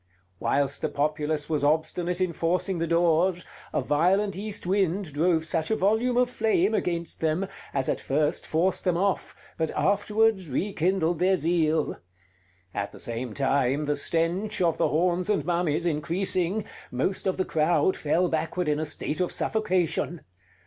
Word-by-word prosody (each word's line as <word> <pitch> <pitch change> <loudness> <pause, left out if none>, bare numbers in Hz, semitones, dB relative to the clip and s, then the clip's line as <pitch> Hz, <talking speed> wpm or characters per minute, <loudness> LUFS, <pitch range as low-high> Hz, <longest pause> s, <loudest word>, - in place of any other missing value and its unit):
Whilst 140 0 0
the - - 0
populace 150 +1 -1
was 150 -3 -1
obstinate 160 +4 0
in 185 -2 0
forcing 175 +3 0
the 165 - -1
doors, 170 +2 +2 0.3
a - - 0
violent 190 +6 +2
east 205 0 -5
wind 190 -3 0
drove 160 +1 +2
such 160 0 0
a 220 - +2
volume 220 +5 +1
of 250 0 +4
flame 220 -4 +2
against 170 -5 -2
them, 160 +4 +1 0.3
as 135 -1 -1
at - - 0
first 150 +2 -1
forced 175 +4 0
them 180 -3 +1
off, 195 +1 -1 0.2
but 160 -1 +1
afterwards 205 -2 +2
rekindled 175 +1 0
their 190 +2 +4
zeal. 160 -2 +1 0.8
At 100 - -3
the - - -11
same 115 -1 -5
time, 140 +1 +1
the 145 0 0
stench 170 +8 -1
of 170 -3 +1
the - - +3
horns 175 +4 +1
and 210 - +1
mummies 170 -2 0
increasing, 175 +5 0 0.2
most 185 +11 -1
of 190 - 0
the 185 - 0
crowd 160 +2 +2
fell 170 +4 +1
backward 165 +2 -1
in 150 0 +1
a 155 - -2
state 155 +1 -3
of 180 - 0
suffocation. 185 -5 0
170 Hz, 160 wpm, -26 LUFS, 155-190 Hz, 0.8 s, of